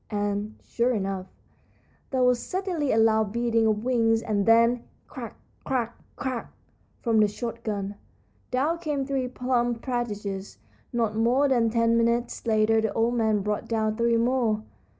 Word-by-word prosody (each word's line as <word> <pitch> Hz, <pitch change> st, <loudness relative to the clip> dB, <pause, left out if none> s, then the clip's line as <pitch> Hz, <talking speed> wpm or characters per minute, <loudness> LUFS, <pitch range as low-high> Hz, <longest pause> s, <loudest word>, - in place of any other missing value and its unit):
And, 205 Hz, 0 st, -2 dB
sure 240 Hz, +2 st, 0 dB
enough, 195 Hz, -2 st, -3 dB, 0.8 s
there 260 Hz, -2 st, +1 dB
was 250 Hz, -1 st, +4 dB
suddenly 360 Hz, -7 st, -2 dB
a -, -, +2 dB
loud 220 Hz, -2 st, +3 dB
beating 230 Hz, -1 st, +1 dB
of 215 Hz, 0 st, 0 dB
wings, 230 Hz, -2 st, +2 dB
and 205 Hz, -2 st, 0 dB
then, 230 Hz, +1 st, +5 dB, 0.2 s
crack! -, -, -8 dB, 0.3 s
crack! 240 Hz, -3 st, -1 dB, 0.2 s
crack! 255 Hz, -4 st, -4 dB, 0.5 s
from 230 Hz, -2 st, +3 dB
the 210 Hz, -, +5 dB
shot 230 Hz, +2 st, -5 dB
gun. 200 Hz, -2 st, -3 dB, 0.6 s
Down 295 Hz, +7 st, 0 dB
came 295 Hz, -5 st, -2 dB
three 265 Hz, -2 st, -1 dB
plump 245 Hz, -2 st, -1 dB
partridges. 210 Hz, -6 st, -3 dB, 0.3 s
Not 230 Hz, -3 st, 0 dB
more 245 Hz, +6 st, +3 dB
than 240 Hz, -4 st, +3 dB
ten 230 Hz, 0 st, +2 dB
minutes 235 Hz, +1 st, 0 dB
later 220 Hz, 0 st, +3 dB
the 220 Hz, -2 st, 0 dB
old 230 Hz, +1 st, +1 dB
man 220 Hz, -3 st, +2 dB
brought 210 Hz, 0 st, -2 dB
down 220 Hz, -1 st, 0 dB
three 235 Hz, 0 st, +2 dB
more. 230 Hz, -3 st, +1 dB
230 Hz, 150 wpm, -26 LUFS, 215-250 Hz, 0.8 s, then